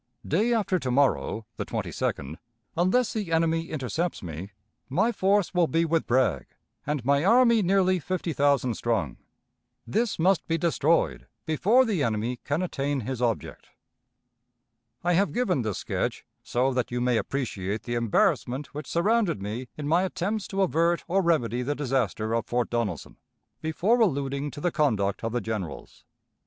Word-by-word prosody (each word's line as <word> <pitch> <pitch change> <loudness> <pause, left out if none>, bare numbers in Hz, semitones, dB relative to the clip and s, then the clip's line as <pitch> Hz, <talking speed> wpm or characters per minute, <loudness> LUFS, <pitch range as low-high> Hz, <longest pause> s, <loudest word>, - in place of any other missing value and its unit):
Day 210 +10 +2
after 200 -5 +1
to 130 - -3
morrow 125 -4 +1
(the - - -2
22d), 70 +3 -3 0.4
unless 190 +8 +2
the 205 -6 -3
enemy 165 0 +1
intercepts 155 - -2
me, 85 +3 -6 0.4
my 220 - +2
force 200 -3 +1
will 175 -2 +3
be 165 +1 +1
with 165 0 0
Bragg, 130 +2 +1 0.4
and 145 -5 -2
my 140 +2 +3
army 235 +2 +5
nearly 185 -1 +3
fifty 175 0 -3
thousand 140 -4 +2
strong. 110 - -1 0.7
This 225 +1 0
must 185 +2 +2
be 165 - +1
destroyed 165 -1 +1 0.2
before 210 - +3
the 205 -9 0
enemy 115 0 -1
can 150 +5 -1
attain 140 -5 -2
his 125 +2 -4
object. 115 -3 -2 1.3
"I 175 +1 +2
have 195 +4 +2
given 200 - +1
this 110 -4 -2
sketch, - - -3 0.2
so 130 +2 0
that 125 -1 -1
you 125 - -2
may 125 -1 +2
appreciate 105 -7 -3
the 120 - -4
embarrassment 120 +4 +1
which 150 0 -6
surrounded 200 - +2
me 110 +6 -5
in 145 -1 -4
my 165 +4 +3
attempts 190 +3 -2
to 195 0 0
avert 170 -1 +1
or 195 +3 +2
remedy 130 -9 +1
the 145 +4 -1
disaster 120 -6 -1
of 115 0 -1
Fort 120 -1 -1
Donelson, 115 -9 -3 0.4
before 180 +9 +1
alluding 140 - 0
to 145 - -9
the 175 - +1
conduct 105 - 0
of 115 - -1
the 120 +1 -1
generals. 105 -7 -6
145 Hz, 160 wpm, -26 LUFS, 120-180 Hz, 1.3 s, army